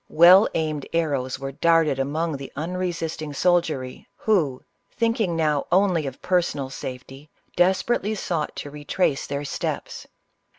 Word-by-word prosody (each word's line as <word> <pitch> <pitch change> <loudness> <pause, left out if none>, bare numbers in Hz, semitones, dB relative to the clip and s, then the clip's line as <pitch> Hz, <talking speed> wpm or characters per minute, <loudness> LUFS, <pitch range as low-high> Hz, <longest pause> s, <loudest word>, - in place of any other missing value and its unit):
Well 180 +5 +7
aimed 155 -3 -2
arrows 140 -6 0
were 135 0 -5
darted 165 -1 +2
among 155 +4 -1
the 135 0 -8
unresisting 165 -2 -3
soldiery, 155 -5 0
who, 155 -12 0 0.3
thinking 230 -6 0
now 150 -3 0
only 180 -5 +3
of 135 - -8
personal 170 -7 0
safety, 135 +3 -8 0.3
desperately 195 +4 +2
sought 170 -6 -3
to 145 - -6
retrace 145 0 -1
their 140 +1 -3
steps. - - -4
155 Hz, 125 wpm, -24 LUFS, 140-180 Hz, 0.3 s, Well